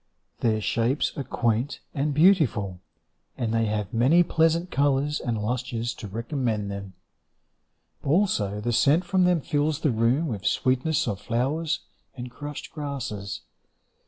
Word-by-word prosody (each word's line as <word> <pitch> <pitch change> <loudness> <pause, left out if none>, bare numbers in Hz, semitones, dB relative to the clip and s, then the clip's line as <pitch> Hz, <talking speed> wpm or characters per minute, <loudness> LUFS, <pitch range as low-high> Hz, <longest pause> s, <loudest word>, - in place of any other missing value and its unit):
Their 110 -2 +1
shapes 120 +6 0
are 140 - -3
quaint 120 +1 -1
and 145 +2 0
beautiful, 140 - +3 0.6
And 115 -3 -1
they 115 0 +2
have 105 -1 -2
many 135 +10 +5
pleasant 165 +1 +1
colours 140 +1 +1
and 120 -3 -2
lustres 120 +1 -2
To 105 - -8
recommend 115 -1 -2
them. 100 -1 -7 1.1
Also 135 - +1
the 120 +3 -1
scent 145 +9 +4
from 185 +1 +2
them 180 -3 +3
fills 150 +2 0
the 150 - +2
room 120 +8 +2
With 105 -8 -4
sweetness 130 +8 +1
of 100 -1 -3
flowers 140 +7 -1 0.4
and 125 0 -6
crushed 145 +2 -7
grasses. 125 -9 -5
125 Hz, 135 wpm, -26 LUFS, 110-150 Hz, 1.1 s, many